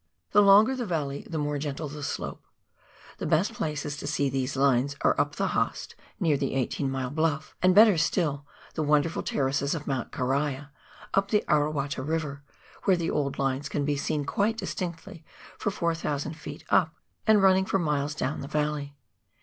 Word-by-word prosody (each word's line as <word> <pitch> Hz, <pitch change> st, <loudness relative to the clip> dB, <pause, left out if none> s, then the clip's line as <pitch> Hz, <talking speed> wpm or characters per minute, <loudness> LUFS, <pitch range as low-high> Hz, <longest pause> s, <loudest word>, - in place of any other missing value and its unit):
The 205 Hz, -, +6 dB
longer 205 Hz, +6 st, +6 dB
the 245 Hz, -3 st, -3 dB
valley 145 Hz, -5 st, -3 dB
the 160 Hz, -, -3 dB
more 145 Hz, -1 st, -1 dB
gentle 150 Hz, +1 st, -4 dB
the 150 Hz, +1 st, -8 dB
slope. -, -, -5 dB, 0.7 s
The -, -, -3 dB
best 170 Hz, +8 st, +2 dB
places 150 Hz, -6 st, -3 dB
to 145 Hz, -, -6 dB
see 145 Hz, -1 st, +1 dB
these 130 Hz, +1 st, -2 dB
lines 135 Hz, 0 st, +2 dB
are -, -, +4 dB
up -, -, -3 dB
the -, -, 0 dB
Haast, -, -, -1 dB, 0.3 s
near 155 Hz, -4 st, +2 dB
the 135 Hz, -1 st, -2 dB
Eighteen 135 Hz, +1 st, -1 dB
mile 130 Hz, -1 st, -3 dB
bluff; 155 Hz, 0 st, -1 dB
and, 185 Hz, 0 st, +4 dB
better 210 Hz, -5 st, +7 dB
still, 150 Hz, -4 st, 0 dB, 0.3 s
the -, -, -2 dB
wonderful 150 Hz, +2 st, +2 dB
terraces 140 Hz, +2 st, 0 dB
of 150 Hz, -, -6 dB
Mount 135 Hz, -3 st, -2 dB
Caria, 140 Hz, +2 st, -1 dB, 0.4 s
up 195 Hz, 0 st, +2 dB
the 210 Hz, -1 st, +2 dB
Arawata 145 Hz, -2 st, 0 dB
River, 150 Hz, -1 st, -3 dB, 0.4 s
where 190 Hz, -3 st, +4 dB
the 165 Hz, -1 st, -1 dB
old 140 Hz, -2 st, -1 dB
lines 135 Hz, +1 st, -1 dB
can 145 Hz, 0 st, -1 dB
be 145 Hz, 0 st, +1 dB
seen 145 Hz, +1 st, -1 dB
quite 220 Hz, +7 st, 0 dB
distinctly 175 Hz, -3 st, -5 dB, 0.4 s
for -, -, 0 dB
4,000 165 Hz, -5 st, -2 dB
ft. 155 Hz, -, -9 dB
up, 165 Hz, -3 st, +3 dB, 0.3 s
and 215 Hz, -2 st, +5 dB
running 190 Hz, 0 st, +5 dB
for 195 Hz, -, +1 dB
miles 150 Hz, -4 st, -1 dB
down 140 Hz, +1 st, -2 dB
the 140 Hz, -, -6 dB
valley. 150 Hz, -1 st, -2 dB
150 Hz, 180 wpm, -27 LUFS, 140-170 Hz, 0.7 s, better